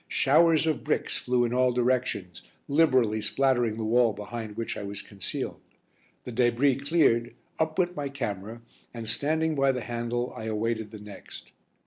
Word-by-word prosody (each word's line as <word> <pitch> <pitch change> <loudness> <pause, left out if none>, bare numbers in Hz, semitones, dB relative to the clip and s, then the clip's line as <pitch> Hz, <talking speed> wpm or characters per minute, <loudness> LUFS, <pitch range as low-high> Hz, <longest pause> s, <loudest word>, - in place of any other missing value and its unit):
Showers 160 +3 +4
of 155 -2 -1
bricks - - -1
flew 125 -1 +1
in 120 - -2
all 125 0 +3
directions, 120 -8 -1 0.3
liberally 130 -8 +3
splattering 120 0 +1
the 115 - -3
wall 115 0 +3
behind 105 0 -7
which 115 - -3
I - - -5
was 100 0 -6
concealed. 100 -3 -5 0.6
The - - -7
débris 125 +3 +2
cleared, 120 -8 +3 0.2
up 160 0 0
went 180 -1 +1
my 145 -1 -3
camera, 110 -3 -5 0.3
and, 115 -1 -6
standing 160 +7 0
by 135 -2 +3
the 125 -1 -3
handle, 120 +1 -3
I 110 - -6
awaited 110 0 -2
the 110 - -9
next. 105 -1 -11
120 Hz, 160 wpm, -27 LUFS, 110-135 Hz, 0.6 s, Showers